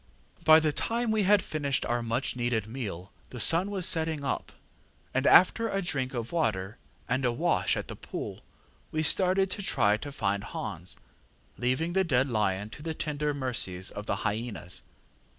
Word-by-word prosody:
ŌĆ£By 155 0 +9
the 155 -2 0
time 235 +5 -1
we 220 -1 +2
had 205 -1 +5
finished 140 -4 -1
our 120 0 0
much 115 +4 -1
needed 120 -3 0
meal 105 -6 -6 0.2
the 125 - -8
sun 175 - +4
was 195 -3 +4
getting 160 -3 -2
up, 140 - -2 0.6
and 130 +1 +1
after 225 +5 +6
a 195 - 0
drink 130 -6 -2
of 120 -1 -4
water 110 - -1 0.3
and 130 - 0
a 125 - +2
wash 120 - +1
at - - -4
the - - -7
pool, - - -6 0.5
we 155 0 0
started 185 +4 +3
to 205 - -3
try 120 - +2
and 140 +6 -4
find 100 -1 -1
Hans, 85 +3 -6 0.6
leaving 130 +8 0
the 190 +1 +3
dead 135 -6 +2
lion 105 -2 0
to - - -10
the 160 0 -4
tender 150 -1 -1
mercies 110 -9 -2
of 105 +1 -7
the - - 0
hy├"nas. 105 -4 -3
130 Hz, 175 wpm, -29 LUFS, 110-160 Hz, 0.6 s, ŌĆ£By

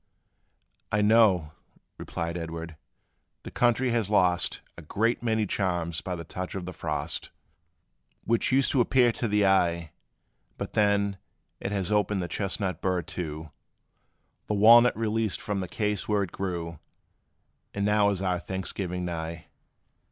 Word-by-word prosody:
"I 105 0 +2
know," 105 -8 +4 0.5
replied 85 0 -4
Edward, 80 -1 -6 0.7
"the - - -8
country 120 +1 +2
has 115 -4 0
lost 90 -4 +2
A - - -10
great 110 +9 0
many 110 -2 +1
charms 90 -4 -1
by 90 - -4
the 85 - -7
touch 90 +3 -6
of 95 -2 -4
the 90 - -6
frost, - - -4 0.9
Which 115 +3 +1
used 135 +1 +3
to 130 - +3
appear 125 0 +4
to 115 - -2
the 105 -1 +2
eye; 85 -4 +2 0.7
But - - -6
then, 100 -1 +2 0.4
it 95 - -4
has 100 -2 -2
opened 105 -2 +1
the - - -3
chestnut 95 0 -2
burr 90 -2 0
too, 80 -2 -6 1.0
The 105 - 0
walnut 115 +4 +7
released 110 -2 0
from 105 -2 -3
the 95 - -3
case 105 +1 -2
where 105 -1 +2
it 90 - -6
grew; 85 -3 -4 0.9
And 100 0 -2
now 105 0 +3
is 100 -1 -2
our 90 -2 0
Thanksgiving 90 0 -4
nigh! 85 -1 -5
95 Hz, 145 wpm, -27 LUFS, 85-105 Hz, 1.0 s, walnut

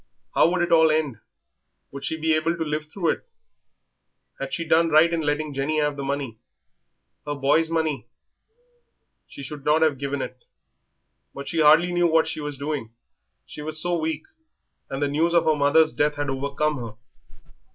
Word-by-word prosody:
How 160 - +4
would 180 0 0
it 175 - -2
all 160 -1 +6
end? 155 -7 0 0.7
Would 140 0 -8
she 160 - -2
be 160 0 +1
able 160 +2 0
to 165 - -1
live 150 0 -3
through 175 -3 -1
it? - - -6 1.1
Had - - -5
she 165 - -3
done 165 +1 +4
right 160 +2 +5
in 165 - 0
letting 150 0 -1
Jenny 140 +3 -1
have 150 -1 0
the 140 - -6
money 135 -5 -3 0.8
her 145 - -4
boy's 145 +4 +2
money? 155 -8 -1 1.2
She 140 - -10
should 145 +1 -8
not 155 +2 +3
have 150 -4 +1
given 140 0 -3
it; 125 -1 -9 0.9
but 140 0 -7
she 165 - 0
hardly 160 +4 +6
knew 175 0 +2
what 160 -1 +3
she 155 - -4
was 145 -1 -5
doing, 140 -5 -4 0.6
she - - -9
was 155 +1 -1
so 175 +2 +1
weak, 155 -2 -2 0.7
and 135 +1 -3
the - - +2
news 160 +4 +1
of 170 - +4
her 155 - +3
mother's 150 +2 +3
death 150 0 +1
had 145 -1 -2
overcome 140 +3 -1
her. 115 -4 -7
150 Hz, 185 wpm, -24 LUFS, 140-160 Hz, 1.2 s, all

